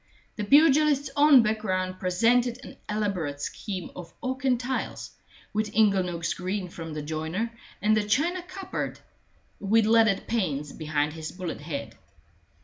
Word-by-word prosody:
The 210 - -3
pugilist's 290 +3 +4
own 285 -4 +7
background 185 -4 -1
presented 235 +7 +2
an - - -10
elaborate 195 -9 -2
scheme 185 +4 -5
of 175 -2 -9
oak 260 +1 -3
and 250 -2 +3
tiles, 255 +1 -4 0.4
with 210 0 -2
inglenooks 185 -6 +2
green 185 +1 -3
from 165 -2 -7
the 150 - -4
joiner, 160 +9 -3 0.3
and 215 +1 +4
a 215 - +2
china 315 - +1
cupboard 370 +2 -5 0.6
with 215 +2 +3
leaded 220 -3 +4
panes 150 -11 -2
behind 150 -2 -1
his 160 -1 -6
bullet 180 -5 -6
head. 140 -8 -6
205 Hz, 140 wpm, -27 LUFS, 170-240 Hz, 0.6 s, own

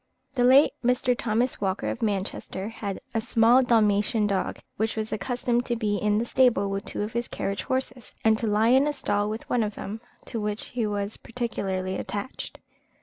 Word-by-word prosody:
The 250 -2 +1
late 265 +4 +7
Mr. 250 0 +2
Thomas 235 +1 0
Walker, 190 - -1
of 110 +1 -3
Manchester, 200 -1 -2
had 205 -3 -5
a 225 - +1
small 230 +3 +5
Dalmatian 215 -3 +3
dog, 195 -2 -1 0.2
which 220 +1 -1
was 220 0 -3
accustomed 240 +3 0
to 240 - 0
be 210 -3 0
in 210 +1 +1
the 230 - 0
stable 240 -5 +3
with 195 0 -3
two - - -3
of 210 - -5
his 235 +1 -1
carriage 200 0 -3
horses, 260 -2 -3
and 220 0 +5
to 230 - -1
lie 215 +2 +3
in 265 +3 +5
a 295 - 0
stall 205 -6 0
with 220 +1 -5
one 245 - +1
of 210 -1 -2
them, 215 +3 -6 0.2
to 225 - -3
which 210 0 -3
he 235 -3 -1
was 205 0 -3
particularly 190 -6 -3
attached. 205 +6 -5
220 Hz, 195 wpm, -26 LUFS, 205-240 Hz, 0.2 s, late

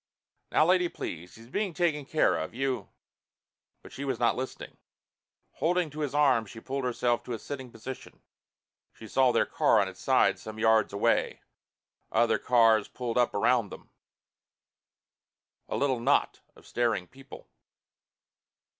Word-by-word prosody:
"Now 155 - +4
lady, 180 0 +3
please. 85 - -7
He's 115 - -14
being 190 - -2
taken 160 -5 0
care 155 +2 +2
of. - - -5
You 135 0 -2 0.5
" - - -58
But - - -13
she 140 - -7
was 135 - -2
not 120 -1 +2
listening. 130 +1 -7 0.7
Holding 175 -1 0
to 150 - -9
his 145 -2 -2
arm 130 -7 +3
she 115 - -10
pulled 135 +3 -4
herself 120 -1 0
to 125 - -5
a - - -3
sitting 130 +2 -7
position. 125 +4 -10 0.7
She 110 - -12
saw 130 +3 +3
their - - +2
car - - +3
on - - +1
its - - -10
side - - +2
some 110 0 -9
yards 110 -1 +3
away, 100 - 0 0.7
other 115 +1 +2
cars 115 -4 +4
pulled 125 -1 -3
up 120 - +1
around 115 +1 +2
them, - - -12 1.8
a - - -2
little 135 -3 +1
knot 120 - +1 0.2
of - - -19
staring 115 -6 -1
people. 135 +1 -14
125 Hz, 155 wpm, -28 LUFS, 115-140 Hz, 1.8 s, Now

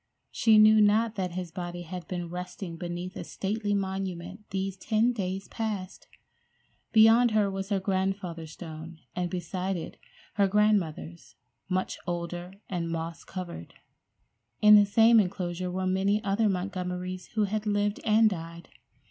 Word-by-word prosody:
She 220 -2 +4
knew 215 0 +7
not 215 +2 +3
that 185 -4 -3
his 180 -2 -5
body 175 0 -5
had 180 +1 -7
been 175 -2 -4
resting 180 0 -6
beneath 175 +2 -5
a - - -5
stately 205 +1 -2
monument 190 0 -4
these 195 0 -2
ten 220 +5 +1
days 195 -3 -3
past! 210 -4 -5 0.8
Beyond 225 +2 +6
her 210 -2 +2
was 195 0 -4
her 200 -2 +1
grandfather's 190 -4 -2
stone, 160 -1 -9 0.2
and 180 -1 -1
beside 180 +2 -3
it 165 - -7 0.4
her 200 -1 +3
grandmother's, 190 -5 0 0.3
much 185 0 -1
older 175 +1 -4 0.2
and 170 -3 -3
moss 165 0 -4
covered. 175 - -7 0.8
In 210 0 +7
the 205 -1 +6
same 225 +3 +6
enclosure 180 -2 -2
were 185 +1 -2
many 195 +3 +1
other 205 +2 +2
Montgomerys 185 -1 -3
who 215 - +3
had 215 +1 -2
lived 205 0 0
and 220 0 +5
died. 170 -3 -5
190 Hz, 145 wpm, -28 LUFS, 175-210 Hz, 0.8 s, knew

